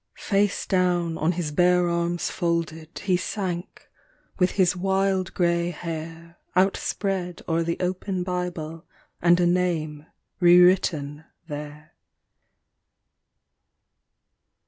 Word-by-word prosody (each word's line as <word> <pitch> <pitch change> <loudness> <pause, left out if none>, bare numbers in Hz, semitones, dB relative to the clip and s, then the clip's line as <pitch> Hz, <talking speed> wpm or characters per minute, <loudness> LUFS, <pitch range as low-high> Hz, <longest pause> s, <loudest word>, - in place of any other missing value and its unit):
Face 200 0 0
down 175 -3 +1
on 165 +3 +1
his 165 -3 -3
bare 180 +2 +3
arms 170 0 -1
folded 165 -1 -2
he 185 -2 +2
sank 185 -1 -4 0.5
with 180 0 +4
his 180 -2 +3
wild 190 0 0
grey 170 -1 +1
hair 165 0 -7 0.2
Outspread 190 -1 0
o'er 165 -1 +1
the 170 0 -1
open 185 0 -2
Bible 175 -3 -4 0.4
and 175 +1 +5
a 175 - +3
name 165 -4 0 0.3
re 175 -1 +7
written 160 -5 +2 0.2
there. 150 0 -8
175 Hz, 100 wpm, -25 LUFS, 165-180 Hz, 0.5 s, re